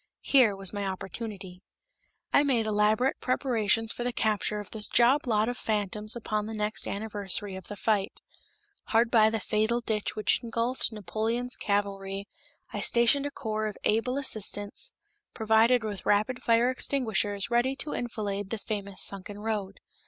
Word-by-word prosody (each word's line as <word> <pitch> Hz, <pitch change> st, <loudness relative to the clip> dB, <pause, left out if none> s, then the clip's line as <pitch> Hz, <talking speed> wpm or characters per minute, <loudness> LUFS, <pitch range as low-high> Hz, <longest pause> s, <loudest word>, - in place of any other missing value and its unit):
Here 245 Hz, -7 st, +4 dB
was 195 Hz, 0 st, 0 dB
my 205 Hz, -1 st, -3 dB
opportunity. 190 Hz, -1 st, -6 dB, 0.7 s
I -, -, +6 dB
made 255 Hz, -6 st, +1 dB
elaborate 215 Hz, +5 st, +2 dB
preparations 225 Hz, -4 st, +1 dB
for 240 Hz, -, -4 dB
the 245 Hz, -, -1 dB
capture 215 Hz, -2 st, 0 dB
of 205 Hz, -, -9 dB
this 215 Hz, -1 st, -1 dB
job 255 Hz, +4 st, +3 dB
lot 215 Hz, -1 st, +2 dB
of 245 Hz, +1 st, -3 dB
phantoms 210 Hz, 0 st, -1 dB
upon 215 Hz, -2 st, -2 dB
the 220 Hz, -, -5 dB
next 210 Hz, 0 st, -1 dB
anniversary 205 Hz, -1 st, 0 dB
of 190 Hz, -, -9 dB
the 205 Hz, -, -7 dB
fight. 205 Hz, -1 st, -1 dB, 0.7 s
Hard 230 Hz, +1 st, +2 dB
by 220 Hz, -2 st, +6 dB
the 220 Hz, 0 st, -2 dB
fatal 220 Hz, +3 st, 0 dB
ditch 220 Hz, -3 st, -2 dB
which 215 Hz, -, +1 dB
engulfed 235 Hz, +2 st, -1 dB
Napoleon's 225 Hz, +4 st, -2 dB
cavalry 200 Hz, -1 st, -2 dB, 0.5 s
I -, -, -3 dB
stationed 240 Hz, +4 st, +4 dB
a -, -, -6 dB
corps 215 Hz, -4 st, -3 dB
of 210 Hz, -, -6 dB
able 235 Hz, +5 st, +1 dB
assistants 220 Hz, -, 0 dB, 0.4 s
provided 225 Hz, +2 st, +3 dB
with 205 Hz, -3 st, -5 dB
rapid 215 Hz, +5 st, +1 dB
fire 235 Hz, +1 st, +3 dB
extinguishers 220 Hz, -6 st, -1 dB
ready 245 Hz, +3 st, +2 dB
to 295 Hz, +2 st, -5 dB
enfilade 205 Hz, -5 st, -3 dB
the 225 Hz, -, -3 dB
famous 200 Hz, -2 st, -4 dB
sunken 200 Hz, +1 st, -1 dB
road. 210 Hz, -2 st, -4 dB
215 Hz, 155 wpm, -28 LUFS, 205-235 Hz, 0.7 s, I